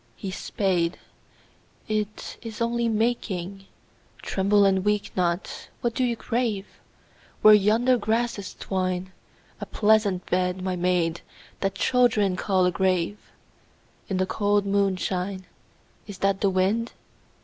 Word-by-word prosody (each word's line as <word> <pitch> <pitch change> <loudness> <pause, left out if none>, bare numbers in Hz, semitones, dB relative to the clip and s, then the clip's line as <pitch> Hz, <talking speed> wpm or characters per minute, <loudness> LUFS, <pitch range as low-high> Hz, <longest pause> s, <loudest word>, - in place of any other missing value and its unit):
His 190 -1 -6
spade, 180 -5 -1 0.9
it 215 -1 -3
Is 225 -2 -8
only 235 0 0
making, 200 -4 -2 0.3
— - - -27
(Tremble 200 +1 +3
and 190 -1 +2
weep 210 0 -1
not 175 0 0
I - - -11
What 240 -1 0
do 260 - 0
you 240 -2 +1
crave 230 -4 -2 0.4
?) - - -31
Where 215 - +9
yonder 225 +5 +4
grasses 220 -2 -1
twine, 185 -1 -2 0.5
A - - -6
pleasant 210 -4 +2
bed, 180 0 0
my 185 -1 -1
maid, 175 -2 0 0.4
that 195 0 -1
Children 225 -5 +2
call 185 -1 +1
a 180 - +2
grave, 185 +2 0 0.9
In 190 - -1
the 185 - +1
cold 205 +1 +1
moonshine. 190 -1 -1 0.6
Is 205 -2 -8
that 195 0 0
the 200 - +3
wind 195 +5 0
200 Hz, 135 wpm, -25 LUFS, 185-215 Hz, 0.9 s, Where